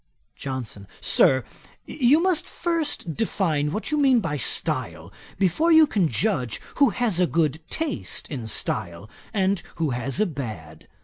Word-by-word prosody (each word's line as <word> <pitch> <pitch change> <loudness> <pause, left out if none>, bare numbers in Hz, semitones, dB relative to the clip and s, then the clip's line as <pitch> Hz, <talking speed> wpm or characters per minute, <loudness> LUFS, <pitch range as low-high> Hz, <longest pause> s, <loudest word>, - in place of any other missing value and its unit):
JOHNSON. 125 -7 -5
'Sir, 130 0 +3 0.4
you 290 +4 +3
must 370 -4 +1
first 325 - -2
define 165 -9 0
what 215 - -4
you 300 - +1
mean 265 -4 +5
by 165 -8 -2
style, 85 - -2 0.2
before 200 - +2
you 320 -1 +8
can 200 - +1
judge 125 - -1 0.2
who 280 -2 +5
has 220 -5 0
a 180 - +4
good 160 -3 +1
taste 320 -3 -3
in 125 -6 -4
style, 100 -3 -2 0.2
and 195 -2 +1
who 160 -4 -1
has 125 - -2
a 215 - +4
bad. 110 - -7
165 Hz, 145 wpm, -24 LUFS, -, 0.4 s, you